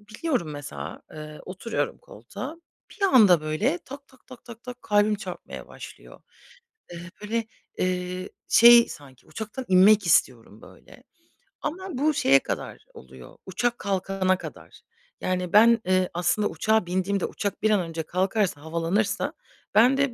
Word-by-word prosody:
biniyorum 215 - -3
mesela, 145 -1 -8
eee, 155 0 -9
oturuyorum 190 +5 -4
koltuğa, - - -9 0.3
bir 405 - -12
anda, 215 - +6
böyle, 200 - -1
tak 275 +1 -11
tak 260 - -24 0.2
tak 235 -1 -12
tak 250 0 -9
kalbim 210 0 +2
çarpmaya 205 - -8
başlıyor. - - -12 0.7
Eee, 175 +1 -9
böyle, 225 +2 -2 0.3
eee, 180 0 -2 0.2
şey, 235 0 +8
sanki 135 -3 -13
uçaktan 220 +4 -7
inmek 195 +2 +5
istiyorum, 115 -8 +1
böyle, - - -17 0.6
ama 375 +5 -5
bu 300 +3 +2
şeye 135 - +4
kadar - - -6
oluyor, 65 -1 -14
uçak 240 +6 -2
kalkana 190 -1 0
kadar. - - -11 0.4
Yani, 180 -1 -2
ben, 230 +2 +6
eee, 185 0 +2
aslında 175 +4 +1
uçağa 220 -3 +1
bindiğimde 185 +2 -1
uçak 200 -2 -4
bir 215 - +3
an 205 - +3
önce 165 -1 -5
kalkarsa 185 -2 -1
havalanırsa 170 +6 -1 0.4
bende 255 +4 +4
200 Hz, 135 wpm, -25 LUFS, 175-235 Hz, 0.7 s, şey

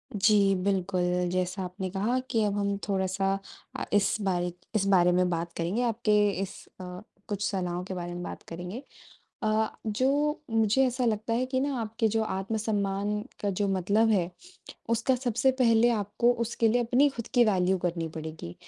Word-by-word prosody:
जी 200 -1 +4
बिल्कुल, 180 -2 0
जैसा 185 +1 -1
आपने 185 +1 -5
कहा 215 +7 0
कि 225 -2 +2
अब 205 0 -1
हम 200 0 0
थोड़ा-सा 195 0 0 0.5
अ, - - -3
इस 205 -1 +3
बारिक 180 -2 -1 0.2
इस 200 -2 +2
बारे 180 -2 +5
में 180 0 +2
बात 170 0 -3
करेंगे 175 +8 -1
आपके 230 -2 +1 0.3
इस 195 - -4 0.3
अ, 180 0 -7 0.3
कुछ 205 -1 -3
सलाहों 180 -3 -2
के 190 +1 -6
बारे 175 -1 -5
में 175 0 -5
बात - - -7
करेंगे। 180 +9 -6 0.6
अ, 215 0 +2 0.2
जो 275 +7 +1
मुझे 225 +3 +3
ऐसा 250 0 0
लगता 220 +1 0
है 245 +2 +1
कि 260 0 -1
ना 280 +1 -1
आपके 225 +1 0
जो 220 +1 +1
आत्म-सम्मान 205 0 -1 0.2
का 205 - 0
जो 200 +1 0
मतलब 200 +4 +2
है, 185 -5 +2 0.6
उसका 230 +3 +2
सबसे 245 +1 +1
पहले 230 0 +5
आपको 220 +2 +1
उसके 230 0 +1
लिए 245 +2 +2
अपनी 250 +5 +4
खुद 235 - -5
की 245 -2 +6
वैल्यू 190 -3 +2
करनी 170 -2 -2
पड़ेगी, 155 - -7
200 Hz, 175 wpm, -28 LUFS, 180-225 Hz, 0.6 s, की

